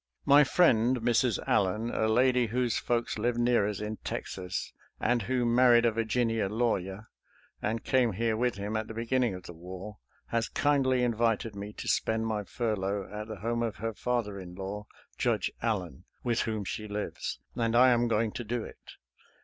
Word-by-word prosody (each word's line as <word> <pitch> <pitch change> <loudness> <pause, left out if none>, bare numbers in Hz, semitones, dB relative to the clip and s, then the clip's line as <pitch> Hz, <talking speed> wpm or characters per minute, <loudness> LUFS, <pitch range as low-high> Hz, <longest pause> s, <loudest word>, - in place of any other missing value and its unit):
My 145 +1 +7
friend 130 -6 +4
Mrs. 120 -1 +2
Allen, 105 +5 +1
a 110 - +1
lady 125 +2 +3
whose 120 +1 0
folks 120 -2 -1
live 120 +2 0
near 120 -3 +3
us 105 - -4
in 105 +1 -4
Texas, 90 -1 -5 0.3
and 120 -1 +2
who 125 +3 0
married 120 0 +5
a 115 - +4
Virginia 115 -1 0
lawyer 105 -2 -1 0.5
and 110 +2 -2
came 125 -4 +2
here 115 +3 0
with 120 0 0
him 105 +2 -4
at 110 0 -2
the 110 - -8
beginning 115 -2 0
of 90 - -9
the 85 - -9
war, 95 +5 -9 0.3
has 115 -1 0
kindly 135 -3 +2
invited 115 -2 0
me 100 +1 -6
to - - -7
spend 110 0 +1
my 110 -2 -1
furlough 100 -3 -2
at 105 +1 -5
the 110 -4 -8
home 115 +2 -1
of 115 -4 -1
her 115 +2 -3
father 115 -4 -2
in 90 -1 -9
law. 100 +2 -6 0.3
Judge - - +1
Allen, 95 - -2 0.2
with 120 0 +1
whom 110 -3 -1
she 110 +2 -4
lives, 105 0 -4
and 115 -1 0
I 125 +2 +7
am 120 -1 +3
going 115 -1 +1
to 120 - -5
do 115 +1 -2
it. - - -12
115 Hz, 180 wpm, -29 LUFS, 105-120 Hz, 0.5 s, My